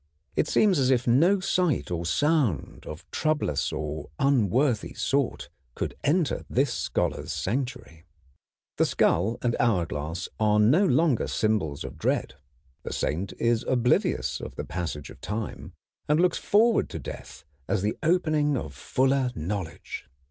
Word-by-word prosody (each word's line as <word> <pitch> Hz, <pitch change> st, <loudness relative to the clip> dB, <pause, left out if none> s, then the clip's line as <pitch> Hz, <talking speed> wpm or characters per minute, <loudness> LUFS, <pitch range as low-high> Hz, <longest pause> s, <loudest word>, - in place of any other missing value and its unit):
It -, -, +2 dB
seems 200 Hz, -7 st, +3 dB
as 130 Hz, -1 st, +3 dB
if 125 Hz, -2 st, +2 dB
no 165 Hz, +12 st, +4 dB
sight 180 Hz, -, 0 dB
or 85 Hz, -1 st, -2 dB
sound 140 Hz, -, 0 dB
of 75 Hz, +3 st, -8 dB
troublous 155 Hz, -1 st, 0 dB
or 75 Hz, -1 st, -4 dB
unworthy 125 Hz, -2 st, +2 dB
sort 140 Hz, -2 st, -1 dB, 0.3 s
could -, -, -3 dB
enter 155 Hz, +1 st, +1 dB
this 130 Hz, -1 st, +1 dB
scholar's -, -, -2 dB
sanctuary. 120 Hz, -, -4 dB, 0.7 s
The -, -, +3 dB
skull 110 Hz, +8 st, +2 dB
and 120 Hz, -1 st, +1 dB
hourglass 85 Hz, -6 st, 0 dB
are 105 Hz, -1 st, +3 dB
no 145 Hz, -, +5 dB
longer 160 Hz, -8 st, +2 dB
symbols 100 Hz, -10 st, 0 dB
of -, -, -8 dB
dread. -, -, 0 dB, 0.5 s
The -, -, -6 dB
saint 90 Hz, +6 st, -2 dB
is 115 Hz, -1 st, +1 dB
oblivious 125 Hz, -1 st, +1 dB
of -, -, -7 dB
the -, -, -5 dB
passage 80 Hz, -3 st, -5 dB
of -, -, -15 dB
time, 105 Hz, 0 st, -5 dB, 0.4 s
and 150 Hz, +1 st, +4 dB
looks 180 Hz, -1 st, +2 dB
forward 220 Hz, +2 st, +3 dB
to -, -, -5 dB
death -, -, -9 dB, 0.2 s
as 100 Hz, -, 0 dB
the 105 Hz, -, 0 dB
opening 155 Hz, -4 st, +2 dB
of 75 Hz, -, -5 dB
fuller 130 Hz, -, +1 dB
knowledge. 85 Hz, -3 st, -5 dB
120 Hz, 140 wpm, -26 LUFS, 90-150 Hz, 0.7 s, no